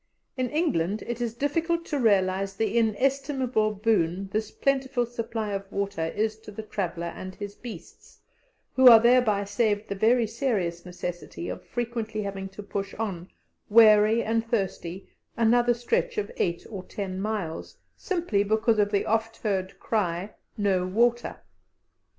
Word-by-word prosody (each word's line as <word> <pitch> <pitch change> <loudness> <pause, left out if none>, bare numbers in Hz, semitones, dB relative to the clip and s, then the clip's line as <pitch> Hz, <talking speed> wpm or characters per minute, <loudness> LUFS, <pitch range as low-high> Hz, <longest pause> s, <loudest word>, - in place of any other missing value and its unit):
In 255 -2 -1
England 215 - 0
it 240 0 -4
is 230 -1 -2
difficult 330 +5 0
to 295 -4 -2
realize 195 -3 +2
the 220 +1 -1
inestimable 255 0 +1
boon 195 -3 +1
this 215 +1 -2
plentiful 270 -2 0
supply 230 -2 -4
of 195 0 -5
water 200 -4 -2
is 215 +1 -1
to 220 - -12
the 215 +1 -7
traveller 170 -5 -3
and 185 0 -8
his 205 -1 -6
beasts, 205 -7 -11 0.5
who 260 -1 +6
are 230 -2 +11
thereby 235 -4 +4
saved 205 +1 0
the - - -1
very 230 +4 +3
serious 205 -7 -2
necessity 175 -1 -6
of - - -6
frequently 230 -3 -3
having 195 -1 -5
to 195 +2 -10
push 200 0 -4
on, 190 -5 -4 0.4
weary 215 +1 +6
and 225 +1 0
thirsty, 190 -4 -2 0.3
another 240 +1 +4
stretch 470 - -1
of 425 +2 -2
eight 170 -1 -1
or 195 -3 -5
ten 190 0 -5
miles, 200 -6 -4 0.2
simply 340 - -1
because 220 +2 +2
of 205 0 +3
the 200 -2 +1
oft 225 +1 0
heard 190 -3 -2
cry, 190 -2 -1 0.2
"No 195 -3 +1
water." 240 +5 +1
215 Hz, 150 wpm, -26 LUFS, 195-240 Hz, 0.5 s, are